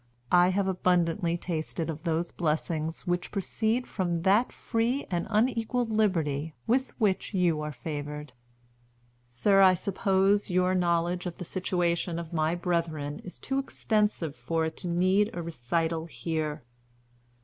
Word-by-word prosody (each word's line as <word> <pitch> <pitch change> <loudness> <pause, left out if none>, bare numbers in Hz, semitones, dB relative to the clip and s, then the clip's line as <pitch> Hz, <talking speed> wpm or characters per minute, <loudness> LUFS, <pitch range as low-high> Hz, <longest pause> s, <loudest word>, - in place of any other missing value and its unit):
I 175 0 +6
have 195 +1 +1
abundantly 175 -1 +1
tasted 165 -1 -3
of 160 -1 -5
those 170 0 -1
blessings 160 0 -2
which 175 -1 -1
proceed 220 +4 -1
from 175 -4 -2
that 205 +6 +4
free 235 +4 -1
and 175 -1 -1
unequalled 230 +1 +1
liberty 160 -8 0
with 260 +3 0
which 200 -1 +1
you 170 -4 +2
are 150 0 -3
favored. 150 +1 -6 1.0
"Sir, 195 +12 +3
I 185 -1 +7
suppose 195 +2 +1
your 180 0 +2
knowledge 175 0 +1
of 175 - -5
the 180 - -6
situation 175 -1 -1
of 170 -1 -6
my 160 +1 +1
brethren 165 -4 -2
is 180 - -9
too 270 0 -2
extensive 210 - 0
for 165 0 -1
it 160 - -4
to 180 - -5
need 185 +4 +3
a 175 - -3
recital 165 +2 -1
here. 155 +2 -3
175 Hz, 140 wpm, -28 LUFS, 160-195 Hz, 1.0 s, I